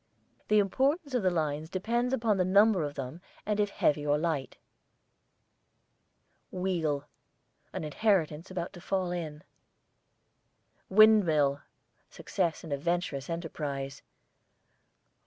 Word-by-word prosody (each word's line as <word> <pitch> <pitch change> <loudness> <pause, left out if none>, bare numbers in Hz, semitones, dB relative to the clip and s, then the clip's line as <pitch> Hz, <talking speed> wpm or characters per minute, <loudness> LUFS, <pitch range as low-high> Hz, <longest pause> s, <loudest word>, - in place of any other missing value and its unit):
The 215 - +4
importance 270 - +1
of 250 - +2
the 185 - +3
lines 155 -2 -2
depends 235 +7 -1
upon 225 -5 +1
the 185 - +3
number 200 +1 +4
of 145 -1 -4
them 135 +5 -6 0.2
and 210 0 -1
if 205 -1 +2
heavy 150 -6 +1
or 145 0 +2
light. 155 -4 -2 1.9
WHEEL, 165 -6 -1 0.7
an - - -5
inheritance 165 0 0
about 180 -1 -4
to 175 - -11
fall 185 -1 -1
in. 155 -4 -5 1.5
WINDMILL, 170 -10 +5 0.5
success 170 -4 -2
in 160 - -8
a 140 - 0
venturous 170 -3 -2
enterprise. 145 -5 -4
175 Hz, 115 wpm, -29 LUFS, 150-200 Hz, 1.9 s, WINDMILL